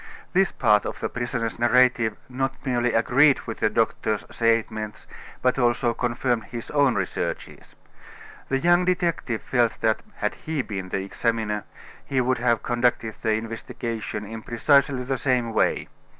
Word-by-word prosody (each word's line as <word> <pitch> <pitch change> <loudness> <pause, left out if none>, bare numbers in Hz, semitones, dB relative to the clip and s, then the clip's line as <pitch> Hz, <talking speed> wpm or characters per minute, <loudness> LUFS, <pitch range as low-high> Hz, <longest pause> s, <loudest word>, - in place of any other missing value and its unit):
This 190 0 +3
part 105 -1 +3
of - - -6
the - - -2
prisoner's 120 -1 -3
narrative 120 -2 +3
not 135 +1 -2
merely 125 -2 +1
agreed 135 +5 +4
with - - -7
the - - +2
doctor's 105 -1 0
statements, 110 -2 -1 0.4
but 130 +1 +2
also 120 0 +2
confirmed 120 -1 -1
his 120 -1 -7
own 140 -4 +3
researches. 95 -2 -4 0.7
The 135 - +2
young 175 +5 +4
detective 170 -10 -1
felt 120 -3 +1
that, 110 -1 +2
had 105 - -1
he 155 -4 -3
been 95 -5 -5
the 95 - -2
examiner, 105 0 -1 0.4
he 135 - -1
would 130 0 +1
have 120 -2 +1
conducted 120 -2 0
the 110 -1 +1
investigation 115 -1 -4
in 110 +2 -7
precisely 135 +3 +2
the 130 0 -2
same 125 -4 +1
way. - - +1
120 Hz, 150 wpm, -24 LUFS, 110-130 Hz, 0.7 s, agreed